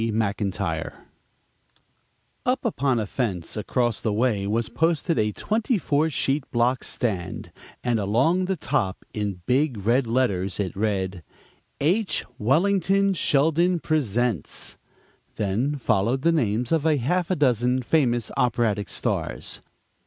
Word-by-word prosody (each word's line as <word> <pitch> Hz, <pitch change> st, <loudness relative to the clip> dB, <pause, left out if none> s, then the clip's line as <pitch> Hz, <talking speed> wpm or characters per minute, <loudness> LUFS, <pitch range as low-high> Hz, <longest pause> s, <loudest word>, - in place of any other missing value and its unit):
McINTYRE 105 Hz, -3 st, -1 dB, 1.5 s
Upon 200 Hz, -, +1 dB
a 110 Hz, -, -1 dB
fence 100 Hz, -8 st, -3 dB
across 120 Hz, +1 st, 0 dB
the 110 Hz, -, 0 dB
way 105 Hz, -2 st, +1 dB
was 110 Hz, +2 st, 0 dB
posted 165 Hz, 0 st, +1 dB
a 105 Hz, 0 st, +1 dB
"twenty 220 Hz, -, 0 dB
four 155 Hz, -3 st, +1 dB
sheet 140 Hz, -1 st, -1 dB
block 120 Hz, +2 st, +1 dB
stand," 95 Hz, -7 st, -3 dB, 0.3 s
and 120 Hz, -2 st, +1 dB
along 130 Hz, -, +2 dB
the 190 Hz, +1 st, 0 dB
top, 95 Hz, -, -1 dB
in 100 Hz, -4 st, -3 dB
big 130 Hz, -6 st, +1 dB
red 120 Hz, +2 st, +3 dB
letters, 100 Hz, -7 st, 0 dB
it 100 Hz, -2 st, -2 dB
read: 95 Hz, -3 st, -1 dB, 0.6 s
"H. 185 Hz, +8 st, +1 dB
Wellington 195 Hz, -, +2 dB
Sheldon 165 Hz, +3 st, +2 dB
Presents" 120 Hz, -, -1 dB, 0.6 s
Then 110 Hz, +9 st, 0 dB
followed 120 Hz, 0 st, +1 dB
the 170 Hz, -, +4 dB
names 120 Hz, -6 st, 0 dB
of 165 Hz, -3 st, +2 dB
a 155 Hz, -2 st, +3 dB
half 170 Hz, +8 st, 0 dB
dozen 125 Hz, -2 st, +2 dB
famous 120 Hz, -5 st, +1 dB
operatic 110 Hz, -5 st, +1 dB
stars. -, -, -2 dB
125 Hz, 120 wpm, -24 LUFS, 105-155 Hz, 1.5 s, the